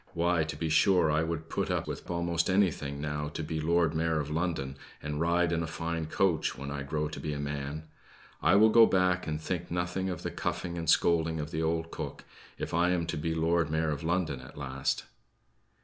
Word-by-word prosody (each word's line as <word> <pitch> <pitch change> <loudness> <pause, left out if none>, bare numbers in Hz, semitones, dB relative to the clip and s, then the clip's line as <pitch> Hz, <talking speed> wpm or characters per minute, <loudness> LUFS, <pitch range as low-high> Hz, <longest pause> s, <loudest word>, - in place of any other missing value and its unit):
"Why, 85 -1 +2
to 75 - -5
be 80 +2 -2
sure 80 +1 +4
I 80 +1 +2
would 80 -1 -3
put - - -2
up - - -1
with - - -6
almost 85 0 0
anything, 85 -7 +1
now, 75 0 -2
to 80 - -2
be 80 +1 -3
Lord 85 0 +2
Mayor 80 0 +1
of 75 0 -3
London, 80 -5 -1 0.2
and 75 +1 -4
ride 85 0 +2
in 85 -1 +1
a 80 - -2
fine 80 0 -3
coach, 85 -1 +1
when 70 +1 -5
I 70 0 -3
grow 75 +2 -2
to 80 - -7
be 75 - -3
a 70 - -4
man! 70 +1 -4 0.6
I - - +5
will 110 +2 +7
go 115 0 +8
back 90 -1 +2
and 75 -1 -2
think 85 +2 -3
nothing 90 +2 -1
of 90 -3 -5
the - - -2
cuffing 85 -1 -3
and 80 -2 -3
scolding 80 -1 +3
of 75 0 -4
the 80 - -2
old 80 0 -1
cook, - - -6 0.3
if - - -5
I 85 +2 +3
am 90 -2 +1
to - - -3
be 80 +2 -2
Lord 80 -1 +2
Mayor 80 0 +1
of 70 - -3
London 80 -4 0
at 65 +2 -13
last." 70 -1 -2
80 Hz, 220 wpm, -30 LUFS, 75-85 Hz, 0.6 s, go